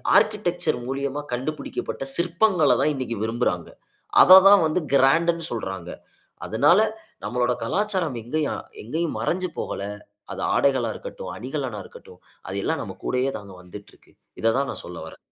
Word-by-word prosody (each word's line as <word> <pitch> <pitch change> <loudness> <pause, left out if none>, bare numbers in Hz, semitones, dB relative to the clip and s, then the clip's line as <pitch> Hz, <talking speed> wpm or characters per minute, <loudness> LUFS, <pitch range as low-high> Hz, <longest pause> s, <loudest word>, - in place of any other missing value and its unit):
Architecture 180 -8 +2
மூலியமா 140 +1 -2
கண்டுபிடிக்கப்பட்ட 135 +2 -4
சிற்பங்கள 170 -2 +2
தான் 155 - +3
இன்னைக்கு 130 -3 -3
விரும்புறாங்க. 110 -6 -1 0.5
அத 185 +1 +10
தான் 200 -3 +7
வந்து 155 +3 0
கிராண்டு 165 +6 +4
னு 165 - -8
சொல்றாங்க. 95 -6 -5 0.6
அதுனால, 145 - +4 0.5
நம்மளோட 125 0 +1
கலாச்சாரம் 185 - -1
எங்கேயும் 150 +5 -2 0.2
எங்கேயும் 160 +9 -2
மறைஞ்சு 185 +1 -1
போகல. - - -4 0.5
அது - - -6
ஆடைகளா 130 -4 +2
இருக்கட்டும், - - -8
அணிகலனா 130 -2 -4
இருக்கட்டும், - - -15 0.3
அது - - -4
எல்லாம் - - -1
நம்ம - - -8
கூடயே 130 +2 0
தாங்க 100 -2 -12
வந்துட்ருக்கு. 100 +3 -14 0.3
இத 115 0 +3
தான் 140 0 0
நான் - - -7
சொல்ல 90 0 -8
வர்றேன். 80 - -11
140 Hz, 140 wpm, -24 LUFS, 120-170 Hz, 0.6 s, அத